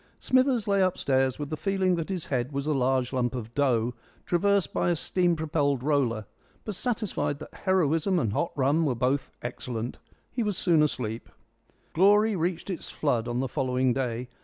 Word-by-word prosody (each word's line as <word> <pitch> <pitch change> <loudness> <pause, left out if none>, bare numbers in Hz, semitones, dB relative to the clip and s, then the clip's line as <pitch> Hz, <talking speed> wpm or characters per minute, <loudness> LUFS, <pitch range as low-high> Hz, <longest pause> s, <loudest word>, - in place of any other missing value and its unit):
Smithers 255 -4 +2
lay 200 -1 +3
upstairs, 135 -8 +1
with 145 0 -5
the - - 0
feeling 190 +1 +1
that 165 -1 -2
his 185 -4 -2
head 130 0 -1
was 140 0 -3
a 155 - +1
large 130 -1 +1
lump 125 -1 0
of 115 -2 -6
dough 125 -4 +1 0.3
traversed 200 +2 +1
by - - +1
a 175 - +2
steam 175 +2 +1
propelled 145 -4 0
roller, 130 -7 +1 0.4
but 215 - -3
satisfied 215 - -1
that 155 - -11
heroism 180 -1 +2
and 115 -11 0
hot 170 - 0
rum 145 +3 +2
were 135 -5 +1
both 130 +4 0
excellent. 120 -1 -5 0.3
He 245 - -2
was 210 -4 -1
soon 165 -4 +3
asleep. 115 -6 -2 0.6
Glory 205 +4 +4
reached 175 +2 -2
its 180 - -6
flood 125 -6 0
on 120 +1 -1
the 135 - -1
following 130 0 +1
day. 125 -2 -2
145 Hz, 180 wpm, -27 LUFS, 125-185 Hz, 0.6 s, Glory